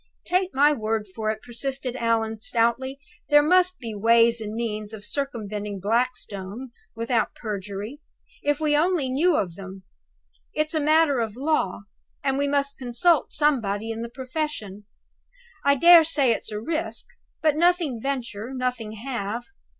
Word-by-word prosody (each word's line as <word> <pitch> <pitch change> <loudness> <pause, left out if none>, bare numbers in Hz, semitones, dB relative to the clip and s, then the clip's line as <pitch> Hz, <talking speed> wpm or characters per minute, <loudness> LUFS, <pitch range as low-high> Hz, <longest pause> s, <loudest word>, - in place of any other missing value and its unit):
"Take 365 +1 +1
my 290 +2 +5
word 220 -4 -2
for 215 0 -2
it," 215 0 -3
persisted 255 +1 -2
Allan, 225 -2 0
stoutly, 235 +4 0 0.3
"there 295 0 +6
must 365 +3 +3
be 230 -6 -6
ways 230 +2 +4
and 215 0 -5
means 215 -2 -4
of 210 -1 -8
circumventing 210 -7 -3
Blackstone 230 +1 -2 0.2
(without 230 0 0
perjury), 205 +4 -5 0.4
if 290 +1 0
we 305 -1 +2
only 315 -3 +2
knew 310 +6 +2
of 180 - -1
them. 190 +1 -10 0.7
It's 305 +1 0
a 315 - +1
matter 305 -2 +3
of 220 -2 -2
law, 280 -10 0 0.4
and 270 -1 0
we 285 - +1
must 280 0 0
consult 275 +7 +2
somebody 225 -8 +1
in 225 0 -5
the 235 - -5
profession. 255 -6 -5 0.8
I 280 0 +4
dare 340 +4 +8
say 285 -5 +3
it's 225 - -1
a 210 - -3
risk. 320 +8 -2 0.4
But 310 -2 +4
nothing 335 -7 +2
venture, 250 -3 -4
nothing 250 -4 -2
have. 230 -1 -4
245 Hz, 150 wpm, -25 LUFS, 220-290 Hz, 0.8 s, dare